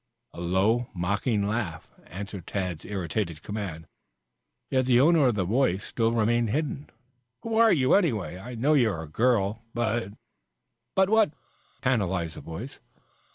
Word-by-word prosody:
A 85 - -8
low, 100 +7 +1
mocking 100 +4 0
laugh 105 -7 -3 0.2
answered 95 0 -7
Tad's 90 -5 -3
irritated 90 -3 -3
command, 95 -6 -5 0.9
yet 130 -1 +2
the 125 -1 +5
owner 155 0 +5
of 120 - +1
the 100 - 0
voice 105 -2 +1
still 115 -1 0
remained 115 0 +2
hidden. 145 +3 -2 0.5
"Who 230 -1 -2
are 225 -1 +6
you, 130 -6 +3
anyway? 115 - +1
I 120 +5 -8
know 135 +7 +2
you 125 -7 +4
are 80 -6 -4
a - - -9
girl, 110 +3 +1
but 115 -3 -1 0.4
" 115 - -55
"But 190 +1 +3
what?" 220 -8 +4 0.5
tantalized 95 -10 0
the - - -8
voice. 100 +12 -8
110 Hz, 155 wpm, -27 LUFS, 95-125 Hz, 0.9 s, are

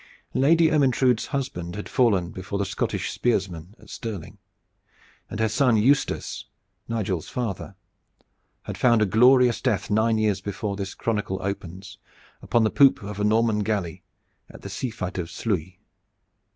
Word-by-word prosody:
Lady 160 +5 +4
Ermyntrude's 130 -5 +2
husband 90 -11 -4
had 105 - -6
fallen 100 -9 +2
before 95 +2 -5
the 100 - -1
Scottish - - -2
spearsmen 95 -5 -2
at - - -17
Stirling, 110 -8 -7 0.9
and 105 - -6
her 110 - +2
son 115 +1 +2
Eustace, 135 +7 +1 0.4
Nigel's 100 -7 -2
father, 100 -5 -4 0.9
had - - -7
found 120 -3 +4
a - - +3
glorious 125 +4 +4
death 105 -7 -1
nine 110 +1 +2
years 105 -3 +1
before 100 +1 -4
this 100 -1 -5
chronicle 105 -4 -2
opens 95 +1 -6 0.4
upon 120 - +2
the 110 - +2
poop 135 -5 +5
of 105 0 -6
a - - 0
Norman 110 0 +2
galley 100 -6 -2 0.5
at - - -14
the - - -6
sea 130 - -3
fight 95 -4 -5
of 85 -2 -4
Sluys. 95 -5 -3
105 Hz, 150 wpm, -24 LUFS, 95-120 Hz, 0.9 s, poop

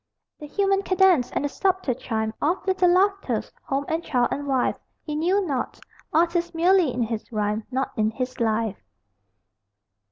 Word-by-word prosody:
The 300 - -8
human 390 +4 +1
cadence 375 -9 +3
and - - -2
the - - 0
subtle 375 -4 0
chime 220 -2 -3
Of 335 +6 0
little 375 -2 +3
laughters, 390 +2 +1
home 275 0 -2
and 325 +1 -1
child 245 -6 +1
and 285 0 -3
wife, 265 -2 +1 0.2
He 300 - -4
knew 370 +6 +1
not. 275 -6 -3 0.3
Artist 340 +1 +1
merely 350 -2 +4
in 240 0 -1
his 225 +1 -4
rhyme, 210 0 -1
Not 265 +1 -1
in 215 -1 +2
his 255 +3 -5
life. 220 - 0
290 Hz, 160 wpm, -24 LUFS, 240-365 Hz, 0.3 s, merely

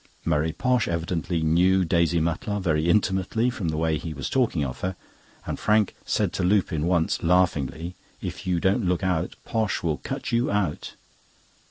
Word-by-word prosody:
Murray 80 0 +1
Posh 125 +8 +1
evidently 85 0 -1
knew 90 +4 +3
Daisy 85 0 +2
Mutlar 90 +7 -1
very 80 -3 +1
intimately 100 +5 +2
from 115 -8 -4
the 80 - -2
way 80 -1 +1
he 80 0 -6
was 65 -2 -4
talking 115 - +1
of 65 - -6
her; 95 0 -2 0.5
and - - -4
Frank 105 -1 +2
said - - 0
to - - -1
Lupin 90 -4 +1
once, 85 -3 +1
laughingly: 85 -2 +1 0.3
"If - - -6
you 90 -2 +1
don't 95 +3 +1
look 90 +1 0
out, 90 -2 0
Posh 110 -3 -1
will 80 -3 0
cut - - -5
you 120 +1 +2
out!" 100 -7 -2
90 Hz, 170 wpm, -25 LUFS, 80-100 Hz, 0.5 s, knew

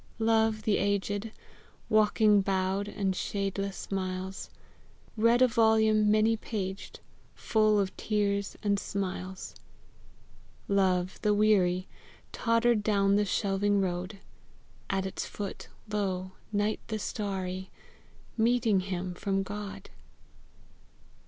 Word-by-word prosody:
Love, 220 -1 +2
the 210 -1 +2
aged, 200 +2 -1 0.6
Walking, 215 -1 +4
bowed, 190 +1 0
the 195 -2 -1
shadeless 195 +1 -3
miles, 185 0 -3 0.7
Bead 230 +3 +4
a - - +6
volume 220 -2 +3
many 215 +1 +4
paged, 200 -3 -5 0.3
Full 215 -1 +2
of 195 -1 -1
tears 200 -2 -1
and 200 -1 +2
smiles. 190 -1 -4 1.1
Love, 185 -2 +1
the 210 -1 +2
weary, 190 -4 +3 0.4
Tottered 230 -1 +2
down 200 -2 +2
the 210 0 +3
shelving 200 +1 +1
road: 185 +1 -2 0.7
At 190 -1 0
its 190 - -4
foot, 205 -2 -6 0.2
lo, 190 -3 -2 0.2
night 210 +1 0
the 220 - -2
starry 190 -3 -4 0.7
Meeting 230 -3 +3
him 185 -1 -3
from 195 +1 -1
God! 205 +1 -7
200 Hz, 105 wpm, -29 LUFS, 190-215 Hz, 1.1 s, a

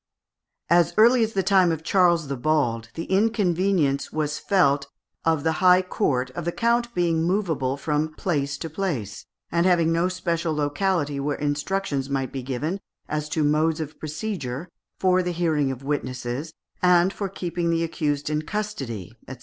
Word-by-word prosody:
As 175 -1 +4
early 235 +2 +6
as 225 0 -2
the 195 - +1
time 190 -2 +4
of 160 -1 -3
Charles 170 -3 +3
the 140 - -2
Bald, 120 -5 0
the 165 - -3
inconvenience 190 -8 +1
was 150 -1 -2
felt 140 -8 +2 0.4
of 160 -3 +2
the 160 - +2
high 185 0 +6
court 130 -9 -1
of 170 - -5
the 170 - -1
count 235 +2 0
being 170 -2 +1
movable 165 -7 0
from 150 +1 -1
place 145 -6 -1
to 165 - -5
place, 150 - -4 0.2
and 170 +2 +2
having 170 -3 +3
no 170 +2 +2
special 170 -3 -1
locality 145 0 0
where 145 +1 -1
instructions 145 -1 -1
might 135 -1 -1
be 135 - -4
given 140 +9 -3 0.3
as 150 0 -3
to 155 0 0
modes 155 +2 +2
of 155 -1 -6
procedure, 155 - -4 0.3
for 185 -1 +3
the 180 -1 -2
hearing 160 -5 +1
of 130 0 -5
witnesses, 135 +1 -3 0.3
and 180 +1 +4
for 200 -2 -3
keeping 175 -2 -3
the 165 0 +1
accused 150 -3 -2
in 150 0 0
custody, 135 - -5
&c. 130 - -6
160 Hz, 165 wpm, -24 LUFS, 145-180 Hz, 0.4 s, early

